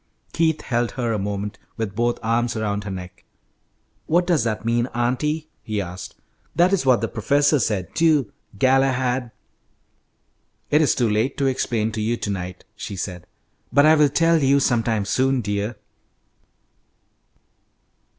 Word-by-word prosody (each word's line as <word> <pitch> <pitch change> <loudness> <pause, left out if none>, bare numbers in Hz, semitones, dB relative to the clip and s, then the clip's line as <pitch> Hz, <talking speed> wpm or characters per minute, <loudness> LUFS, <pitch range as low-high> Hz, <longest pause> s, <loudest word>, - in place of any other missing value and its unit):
Keith 160 -1 +1
held 120 -1 -1
her 120 -3 -1
a 105 - -1
moment, 100 +1 -4 0.2
with 110 -3 -3
both 120 +2 +1
arms 115 +2 0
around 105 -1 -2
her - - -4
neck. 90 -1 -8 0.8
"What 175 +3 +3
does 170 -8 +2
that 110 -1 -2
mean, 120 +1 +1
auntie?" 150 +6 -1
he 110 -3 -3
asked. 90 -1 -6 0.4
"That 175 +4 +4
is 170 -9 +1
what 125 -2 +4
the 115 - 0
professor 145 +7 +2
said, 100 -7 -1
too, 155 -8 +2 0.3
Galahad." 130 0 +2 1.4
"It 150 +2 +5
is 150 - +3
too 120 - +2
late 110 +6 0
to 140 - 0
explain 120 -4 0
to 110 0 -4
you 115 +2 0
to 105 - -3
night," 90 -1 -6
she 105 -1 -6
said, 90 -2 -6 0.4
"but 145 +2 +5
I 155 - +7
will 150 -2 +4
tell 165 +2 +3
you 140 +1 +4
sometime 115 -5 +1
soon, 130 +5 +1
dear." 105 0 -2
120 Hz, 150 wpm, -22 LUFS, 105-140 Hz, 1.4 s, I